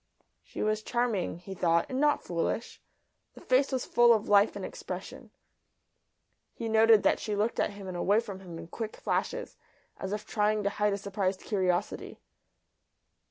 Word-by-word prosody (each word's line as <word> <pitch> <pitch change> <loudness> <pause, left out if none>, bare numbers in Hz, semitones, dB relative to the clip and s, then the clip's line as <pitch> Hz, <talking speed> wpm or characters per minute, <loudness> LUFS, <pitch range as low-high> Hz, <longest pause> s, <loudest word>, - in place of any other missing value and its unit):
She - - -6
was 215 0 0
charming, 230 -7 -1
he 180 +3 -9
thought, 170 -2 +2
and 260 - -3
not 295 0 +2
foolish; 175 +6 -3 0.5
the - - -11
face 260 +2 +2
was 260 -2 -1
full 240 0 +5
of 215 - -3
life 205 +1 +4
and - - -5
expression. - - -7 1.3
He 230 - -4
noted 220 -1 +5
that - - +3
she 210 - -3
looked 215 +3 0
at - - +1
him 200 -1 -9
and 185 - -5
away 200 +4 +3
from 205 -5 -6
him 175 -3 -9
in - - -8
quick 215 +6 -6
flashes, - - -2 0.4
as 190 - -5
if 210 0 -3
trying 210 -1 +1
to 200 - 0
hide 210 0 +1
a - - -1
surprised 195 -1 -2
curiosity. 185 -4 -1
210 Hz, 170 wpm, -29 LUFS, 190-225 Hz, 1.3 s, full